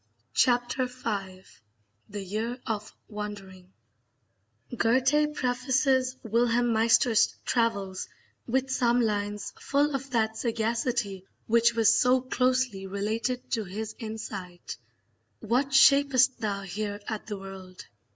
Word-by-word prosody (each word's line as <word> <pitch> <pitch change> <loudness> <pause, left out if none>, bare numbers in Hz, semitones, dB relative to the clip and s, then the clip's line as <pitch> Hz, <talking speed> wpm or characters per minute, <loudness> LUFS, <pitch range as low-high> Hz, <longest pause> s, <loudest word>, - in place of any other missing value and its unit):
Chapter 245 +1 +2
V 200 -7 -5 0.7
The 205 0 -5
Year 220 +6 -3
of 215 -1 -3 0.2
Wandering 200 -3 -8 1.0
Goethe 265 +6 +2
prefaces 260 0 +1
Wilhelm 235 +1 +2
Meister's 225 +1 +3
travels 200 -6 -1 0.4
with 265 +2 0
some 245 -1 +2
lines 205 -2 -2
full 290 +1 +1
of 275 0 -4
that 220 -3 0
sagacity 225 -4 -1 0.2
which 235 +1 +3
was 225 -2 +5
so 250 +1 +4
closely 255 -5 0
related 215 +5 -3
to 225 - 0
his 210 +3 -6
insight: 205 -6 -7 0.6
What 245 +5 +1
shap'st 275 -1 +5
thou 200 -2 -2
here 205 +2 -4
at 220 -1 -5
the 210 -2 -4
world? 190 -1 -10
230 Hz, 110 wpm, -27 LUFS, 205-255 Hz, 1.0 s, was